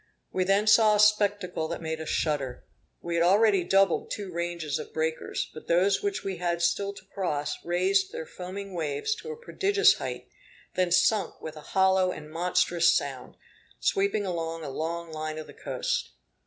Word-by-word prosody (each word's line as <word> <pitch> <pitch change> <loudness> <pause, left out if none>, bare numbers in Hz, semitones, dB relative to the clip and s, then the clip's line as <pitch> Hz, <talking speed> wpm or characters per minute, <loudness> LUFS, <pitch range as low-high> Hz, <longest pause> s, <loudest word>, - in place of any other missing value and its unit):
We 185 - 0
then 195 +2 +3
saw 215 0 +6
a - - +1
spectacle 205 -5 +2
that 170 - -4
made 160 -1 -4
us 160 - -5
shudder. 140 -5 -1 0.4
We 170 - -4
had 170 0 +3
already 200 +1 +4
doubled 195 0 +2
two 200 -3 -5
ranges 170 -3 -2
of - - -9
breakers; 160 0 -2
but 155 - -11
those 185 +4 +3
which 405 -1 -2
we 190 -2 -3
had 170 0 -1
still 200 +3 +1
to 190 - -14
cross 150 -7 -2
raised 190 +3 +1
their 160 - -5
foaming 190 +3 -7
waves 155 - -1
to - - -9
a 460 - -7
prodigious 410 -3 +3
height, - - -5 0.5
then 185 -1 +1
sunk 185 +4 +2
with 160 0 -7
a 155 - -9
hollow 190 +2 +3
and 150 -3 -9
monstrous 175 0 +2
sound, 135 -3 -3 0.4
sweeping 200 +1 +1
along 165 -2 -3
a 140 - -5
long 165 +3 -4
line 155 0 -4
of 155 - -6
the - - -13
coast. - - -2
180 Hz, 180 wpm, -27 LUFS, 160-200 Hz, 0.5 s, saw